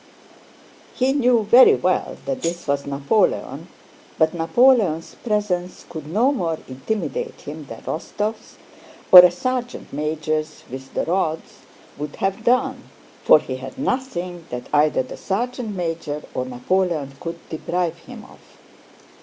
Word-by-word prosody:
He 260 +1 +2
knew 250 -5 +3
very 240 +5 +7
well - - -1
that 265 -1 -3
this 170 +1 -3
was 140 -1 -1
Napoleon, 140 +9 0 0.5
but 160 -1 +3
Napoleon's 170 0 +3
presence 205 -5 -2
could 155 -3 -8
no 225 - +2
more 170 - -1
intimidate 220 - -4
him - - -8
than - - -10
Rostóv's, 210 +2 -4 0.5
or 185 - +13
a 180 0 +9
sergeant 245 +7 -4
major's 155 +1 -2
with 130 +1 -8
the - - 0
rods, 165 -5 -2 0.4
would 150 0 -5
have 195 +3 -2
done, 250 +2 +1 0.3
for - - +8
he 130 -3 -5
had 130 +1 -9
nothing 185 - -3
that 125 0 -6
either 150 -2 +3
the 130 - -9
sergeant 230 +1 -3
major 165 -4 -3
or 130 - -2
Napoleon 150 +3 -1
could 170 0 -5
deprive 170 +1 -2
him 230 +4 -11
of. - - -17
175 Hz, 135 wpm, -22 LUFS, 155-225 Hz, 0.5 s, or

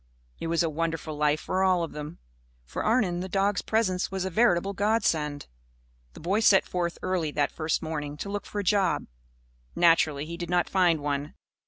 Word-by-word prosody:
It - - -4
was 170 +1 +1
a - - +1
wonderful 160 0 -3
life 150 0 +2
for 185 - -1
all 185 -2 +3
of 165 - -4
them. 150 +2 -7 0.5
For 60 - -4
Arnon, 215 -6 +2
the 185 +1 -4
dogs' 200 +2 +1
presence 195 -5 0
was 190 -1 -3
a 190 - -3
veritable 200 -2 +2
godsend. 190 -9 0 0.7
The - - -12
boy 190 +6 0
set 205 -3 +5
forth 175 -1 -2
early 180 -4 0
that 145 -1 +1
first 155 0 -1
morning, 150 -2 -4
to 200 - -5
look 205 0 -4
for - - -7
a 205 - 0
job. 195 -2 +2 0.7
Naturally, 160 -4 +3
he 170 +2 -7
did 175 -1 -5
not 175 -1 +2
find 175 -5 +2
one. 145 0 -3
175 Hz, 190 wpm, -27 LUFS, 155-190 Hz, 0.7 s, set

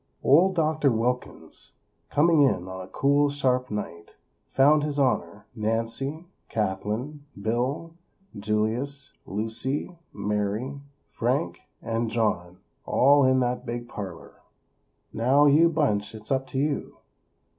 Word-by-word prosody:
Old 180 +8 +5
Doctor 155 -4 +2
Wilkins, 120 +2 -3 0.4
coming 160 +1 +4
in 95 -10 +2
on 95 0 -6
a 90 - -8
cool, 140 +8 +2
sharp 130 -3 0
night, 85 -5 -6 0.3
found 145 +3 +4
His 150 -1 -2
Honor, 105 -8 0
Nancy, 115 +8 -2 0.2
Kathlyn, 105 +8 -2 0.2
Bill, 125 +10 -2 0.4
Julius, 110 +7 -2
Lucy, 115 - -3 0.2
Mary, 105 +7 -2 0.3
Frank - - -1 0.2
and 115 0 -1
John 90 -6 -1 0.2
all 140 +2 +4
in 130 0 +4
that 125 0 -1
big 120 0 -5
parlor. 95 -7 -8 0.7
"Now, 130 +6 +4
you 155 +4 +6
bunch, 110 -11 0
it's 110 +2 -10
up 135 0 0
to - - -6
you. 145 +1 -1
125 Hz, 115 wpm, -26 LUFS, 105-145 Hz, 0.7 s, you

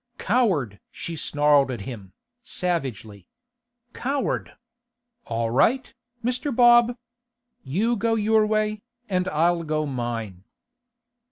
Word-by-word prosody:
'Coward!' 185 - +1
she 170 - -6
snarled 145 -2 +3
at 120 -5 -4
him, 100 -4 -8 0.3
savagely. 125 - -4 0.7
'Coward! 275 +2 -2 0.7
All 115 0 -2
right, 255 - +2 0.3
Mr. 250 +4 -1
Bob. 240 0 +5 0.7
You 205 - 0
go 225 +1 0
your 215 0 +3
way, 215 0 0 0.3
and 185 -1 0
I'll 170 +3 +2
go 155 -1 -1
mine. 115 -8 -4
170 Hz, 100 wpm, -24 LUFS, -, 0.7 s, Bob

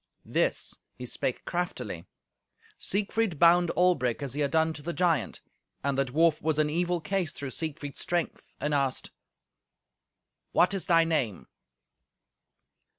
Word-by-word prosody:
This - - 0 0.2
he 125 - -7
spake 125 +1 -2
craftily. 125 - -3 0.7
Siegfried 205 -2 0
bound 175 +2 +5
Albric 145 -9 +2
as 135 -3 -3
he 150 - -2
had 140 - +2
done 160 +2 +2
to 155 - -8
the 170 +4 -4
giant, 165 -8 +1 0.4
and 140 0 +1
the 135 0 +2
dwarf 155 +4 +2
was 155 0 0
in 150 -1 +2
evil 175 +2 +1
case 175 0 -1
through 140 -2 -6
Siegfried's 145 -2 -4
strength, 175 -1 -1 0.2
and 150 0 -1
asked, 135 -2 0 1.4
"What 180 - +4
is 195 - -3
thy 165 -2 +5
name?" 130 - -1
160 Hz, 140 wpm, -28 LUFS, 140-175 Hz, 1.4 s, bound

